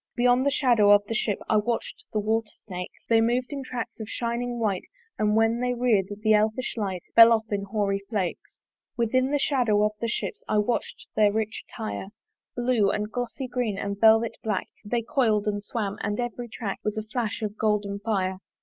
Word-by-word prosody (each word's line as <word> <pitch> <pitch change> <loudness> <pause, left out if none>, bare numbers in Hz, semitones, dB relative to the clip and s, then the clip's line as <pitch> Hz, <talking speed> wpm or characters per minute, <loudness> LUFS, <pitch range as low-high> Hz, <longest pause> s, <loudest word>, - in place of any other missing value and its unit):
Beyond 245 +2 +3
the - - +6
shadow 240 -7 +4
of 205 0 +7
the 225 - -4
ship 215 -2 0
I 215 - +3
watch'd 230 +3 -2
the - - -2
water 220 +1 0 0.2
snakes: 180 -3 -7
They 225 -1 +4
mov'd 245 +3 +1
in 280 - -4
tracks 245 -3 -5
of 220 - -6
shining 240 +1 -2
white; 210 -5 -1 0.3
And 210 0 +2
when 225 +1 +3
they 250 0 0
rear'd, 230 -6 +2 0.2
the 215 -1 +5
elfish 215 +4 +1
light 195 -6 -3
Fell 230 0 +10
off 220 -1 +1
in 200 -1 -1
hoary 200 -1 0
flakes. 195 -6 -3 0.4
Within 255 +3 +2
the 290 - +2
shadow 245 -7 +2
of 210 - +2
the 230 - 0
ship 230 - -2
I 215 - +1
watch'd 210 +3 -1
their 210 -1 +4
rich 220 +1 -3
attire: 215 -4 -5 0.5
Blue, 240 -5 +2 0.2
glossy 245 +3 -4
green, 245 -5 -2
and 200 0 -3
velvet 225 +1 +5
black 210 -4 -2
They 230 +3 -1
coil'd 220 -4 +1
and 205 -1 -1
swam; 210 -2 -3
and 205 +2 -2
every 240 0 -3
track 215 -3 -4
Was 210 +1 -2
a 215 - -2
flash 220 0 -3
of 210 -1 -3
golden 210 -2 0
fire. 190 -3 -1
220 Hz, 195 wpm, -26 LUFS, 205-240 Hz, 0.5 s, Fell